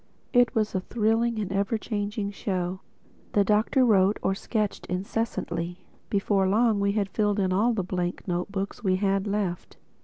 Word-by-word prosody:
It 245 0 +4
was 215 -1 +1
a 190 - +1
thrilling 225 +3 +1
and 205 -3 -3
ever 200 +3 0
changing 205 -1 -3
show. 185 -2 -2 0.5
The 205 - +4
Doctor 215 +6 +3
wrote 200 -2 +4
or 190 - +2
sketched 210 +1 -2
incessantly. 180 -2 -3 0.2
Before 195 -1 +2
long 220 +1 +3
we 200 0 +1
had 205 -2 0
filled 205 +1 0
all 225 +6 +3
the 195 - 0
blank 180 0 -3
note 180 +1 -2
books 200 +2 -4
we 185 -2 +3
had 195 +1 0
left. 200 -4 -2
200 Hz, 160 wpm, -26 LUFS, 190-215 Hz, 0.5 s, It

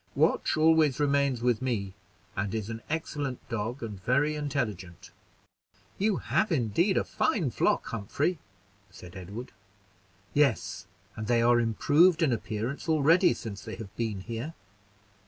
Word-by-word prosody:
Watch - - +2
always 155 -3 +4
remains 140 -4 +1
with 125 -1 +2
me, 105 -7 -2 0.4
and 100 +2 -2
is 110 0 -3
an 115 0 -6
excellent 145 -4 -3
dog, 115 +3 -3
and 105 -4 -6
very 140 +6 +2
intelligent." 120 - -4 0.9
"You 205 +1 +2
have 215 - 0
indeed 160 - +2
a - - +2
fine 210 - 0
flock, - - +1
Humphrey!" 140 - -2 0.5
said 90 +1 -13
Edward. 100 +7 -7 0.8
"Yes, 100 -9 +1 0.3
and 110 -1 -5
they 120 -1 +3
are 120 0 +5
improved 155 - +4
in 150 - +3
appearance 115 +8 -4
already 160 +4 +4
since 100 -4 -7
they - - -6
have 105 -3 -10
been 110 -4 -2
here. 115 +9 -5
125 Hz, 135 wpm, -28 LUFS, 110-150 Hz, 0.9 s, are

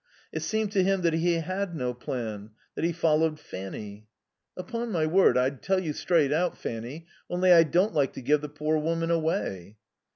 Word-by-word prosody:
It - - -2
seemed 220 -2 -1
to 200 -2 +2
him 195 -1 +1
that 170 -1 +2
he 170 +2 +2
had 185 +2 -2
no 125 -4 -2
plan; 110 -4 -5 0.2
that - - -4
he 170 - +2
followed 160 -2 +1
Fanny. 100 0 -8 0.5
"Upon 230 +5 -4
my 165 -5 +1
word 175 -2 +4
I'd 130 +1 0
tell 190 0 +1
you 160 -5 -3
straight 150 -3 +2
out, 175 +3 0
Fanny, 120 +8 -6 0.2
only 180 +1 +3
I 170 - +8
don't 175 +6 +2
like 140 -3 +1
to - - -7
give 145 +4 +2
the 150 - -6
poor 155 +1 -1
woman 165 +2 -1
away." 155 - -2
160 Hz, 190 wpm, -27 LUFS, 135-180 Hz, 0.5 s, I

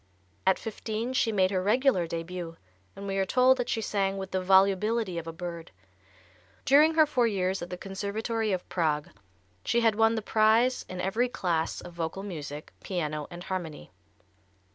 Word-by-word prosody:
At 190 - +5
fifteen 225 +2 -4
she 230 -3 +2
made 190 -2 +2
her 185 -2 0
regular 215 -3 +2
début, 165 0 -5 0.4
and 200 - -8
we 195 0 -2
are 195 - +2
told 255 +5 +4
that 245 - -2
she 225 - 0
sang 195 -2 -1
"with 190 0 -6
the 185 - 0
volubility 195 +1 +3
of 165 - -9
a - - -3
bird." 170 -1 -7 1.0
During 300 +4 +5
her 315 -1 +6
four 250 -5 +2
years 190 -3 -1
at 175 - -6
the 180 - -5
Conservatory 210 +4 -3
of 185 -2 -2
Prague 150 -4 0 0.5
she 235 - +1
had 225 -1 +4
won 225 +1 +3
the 220 - -3
prize 220 +4 +3
in 185 - -6
every 220 +7 0
class 170 -8 -1
of 175 - -10
vocal 170 +3 -4
music, 150 -6 -7
piano 155 -5 -3
and 175 0 -9
harmony. 175 - -5
195 Hz, 175 wpm, -28 LUFS, 175-225 Hz, 1.0 s, her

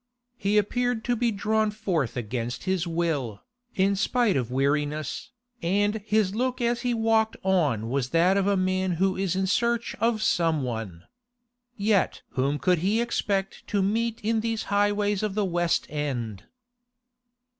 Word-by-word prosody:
He 205 +2 +1
appeared 245 +2 0
to 245 - +1
be 240 +1 +1
drawn 215 +1 +1
forth 180 - -2
against 120 +1 -3
his 185 -2 0
will, 160 -10 -2 0.3
in 195 +1 +2
spite 230 +1 +1
of 125 -4 -1
weariness, 145 +3 -1 0.3
and 205 +4 +1
his 215 -2 +1
look 255 +3 -1
as 235 0 0
he 245 -1 0
walked 225 -1 +2
on 150 - +1
was 130 +1 -1
that 170 +5 +3
of 195 0 +1
a 200 -1 +2
man 185 0 0
who 190 +3 +1
is 185 -2 -1
in 190 0 +1
search 235 +4 0
of 225 0 +1
some 165 -8 +2
one. 110 -9 -5 0.7
Yet 205 -2 +1
whom 140 +3 0
could 180 +3 +2
he 200 +6 +1
expect 200 -4 -2
to 200 -2 +1
meet 225 +3 0
in 225 +1 +1
these 225 0 -2
highways 205 0 +2
of 210 -2 -2
the 210 -1 +1
West 175 -2 0
End? 125 -9 -4
195 Hz, 155 wpm, -26 LUFS, 155-220 Hz, 0.7 s, that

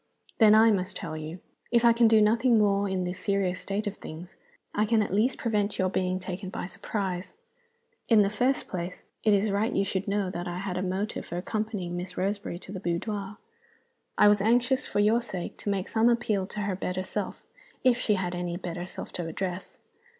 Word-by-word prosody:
"Then 215 -2 +7
I 225 +1 +7
must 185 -3 -1
tell - - -5
you. 155 +3 -7 0.3
If 235 0 +3
I 235 - +7
can 235 0 +5
do 220 -1 +6
nothing 230 +3 +4
more 200 -1 +3
in 190 -1 -1
this 180 +1 -4
serious 185 -1 0
state 200 +2 -2
of 205 -1 -3
things, 165 +3 -9 0.4
I 210 - +2
can 215 0 +3
at 200 - -4
least 230 +6 +2
prevent 210 -3 0
your 185 0 +2
being 185 -1 0
taken 185 +1 -5
by 185 - -4
surprise. 190 - -4 0.7
In 220 -3 +7
the 200 - 0
first 250 +5 +1
place, 180 0 -5 0.2
it 215 - +4
is 205 +1 +3
right 210 +4 +1
you 195 - +1
should 190 0 -2
know 200 -2 0
that 175 0 -4
I 175 0 -4
had 185 -1 -3
a 180 - -1
motive 190 +3 -2
for 175 - -4
accompanying 205 -2 -3
Miss 180 +1 -6
Roseberry 200 -1 -2
to 185 - -10
the 195 - -5
boudoir. 195 +3 -3 0.8
I 210 - +7
was 205 -1 +5
anxious 245 +4 +2
(for - - -1
your 215 +3 +4
sake) 190 -7 -5
to - - -4
make 195 -2 -1
some 225 +1 +3
appeal 215 -5 +1
to 210 - -5
her 200 -2 -1
better 185 0 -3
self 200 +1 -4 0.4
if 250 -2 +4
she 215 -4 +2
had 185 -2 -2
any 175 -1 -3
better 175 -1 -5
self - - -7
to 175 -2 -3
address. 180 +2 -4
200 Hz, 210 wpm, -28 LUFS, 180-215 Hz, 0.8 s, Then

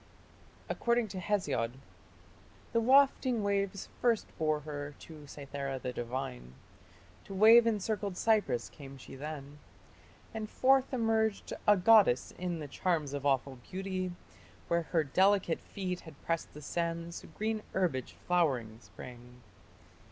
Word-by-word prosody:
According 235 -2 +1
to 185 - -5
Hesiod, 165 - 0 1.0
The 230 - +4
wafting 260 -2 +4
waves 200 -1 -1
First 235 -3 +1
bore 155 -1 +1
her 145 -1 -6
to 155 -3 -12
Cythera 140 -1 -5
the 125 -1 -4
divine: 90 - -5 0.7
To 195 - -8
wave 225 +4 +8
encircled 205 -3 -1
Cyprus 205 - +1
came 140 -2 -11
she 130 - -12
then, 145 0 -7 0.7
And 220 -1 -4
forth 265 0 +3
emerged, 225 -4 0
a 210 -1 +7
goddess, 195 - +5
in 180 -1 -2
the 150 -2 -6
charms 155 -2 -1
Of 140 0 -1
awful 135 -1 +1
beauty. 185 -1 -3 0.6
Where 170 0 +2
her 165 -3 +2
delicate 190 +4 +2
feet 185 -2 -4
Had 160 -3 -13
pressed 165 -1 -2
the 150 - -9
sands, 170 +2 -3
green 215 0 -1
herbage 165 -10 -1
flowering 130 -11 +1
sprang. 120 +5 -12
170 Hz, 130 wpm, -32 LUFS, 140-210 Hz, 1.0 s, wave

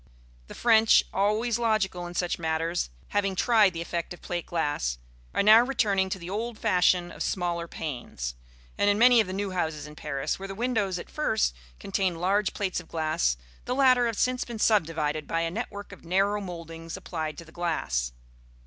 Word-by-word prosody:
The - - -10
French, 225 -2 +5
always 215 +4 +1
logical 195 -6 0
in 175 - -9
such 175 0 -1
matters, 165 - -1 0.2
having 195 -2 0
tried 215 -2 +4
the 165 0 -4
effect 170 +1 -4
of - - -23
plate 175 -1 -4
glass, 145 - -1 0.3
are - - +1
now 215 +3 +8
returning 205 -7 +1
to 190 - -2
the 170 -2 -9
old 220 +4 -3
fashion 180 -2 +2
of - - -10
smaller 170 -2 -1
panes; 120 - -5 0.5
and 205 - +4
in 205 - +3
many 240 +1 +7
of 210 - -3
the - - -5
new 195 +1 -2
houses 160 -5 -2
in 150 0 -11
Paris, 140 +1 -3
where 195 - -6
the 195 - -6
windows 215 -5 0
at - - -7
first 220 - +1 0.3
contained 190 -3 -1
large 195 +3 +1
plates 195 -4 -1
of 180 - -12
glass, 155 - 0 0.3
the 250 - -1
latter 255 -3 +5
have 225 -3 -3
since 250 0 +1
been 235 -2 -7
subdivided 160 -8 +1
by 165 - 0
a 165 0 -1
network 205 -1 -5
of 200 - -12
narrow 195 +4 +1
mouldings 165 -3 -7
applied 155 -3 -4
to 170 - -9
the 160 - -16
glass. 155 - -1
185 Hz, 190 wpm, -27 LUFS, 165-215 Hz, 0.5 s, now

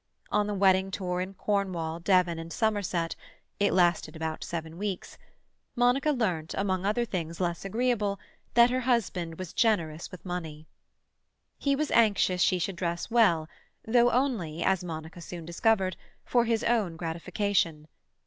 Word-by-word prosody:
On 210 0 +2
the 210 - -2
wedding 190 -1 +4
tour 180 -2 -2
in 190 +1 -5
Cornwall, 185 -5 -1
Devon, 175 -2 +2
and 165 0 -7
Somerset—it 205 -2 -2
lasted 175 -2 +2
about 160 0 -4
seven 165 0 -5
weeks—Monica 245 +6 -2
learnt, 185 - -1
among 190 -1 0
other 235 +3 +1
things 170 -6 -4
less 175 -2 -1
agreeable, 210 -1 0 0.4
that 240 +1 +7
her 255 - +1
husband 195 -10 0
was 185 -3 -7
generous 170 -9 +1
with 185 - -12
money. 160 -4 -5 0.9
He 280 -1 +2
was 305 +1 -1
anxious 200 -5 +3
she 185 - +4
should 180 +1 -3
dress 170 +3 -3
well, 195 -10 +4 0.4
though 240 +2 +4
only, 225 - 0
as 190 -2 +2
Monica 160 0 -7
soon 170 0 -8
discovered, 190 +2 +1 0.3
for 240 -1 +2
his 230 -1 0
own 215 -8 +1
gratification. 165 0 -1
185 Hz, 140 wpm, -28 LUFS, 170-220 Hz, 0.9 s, that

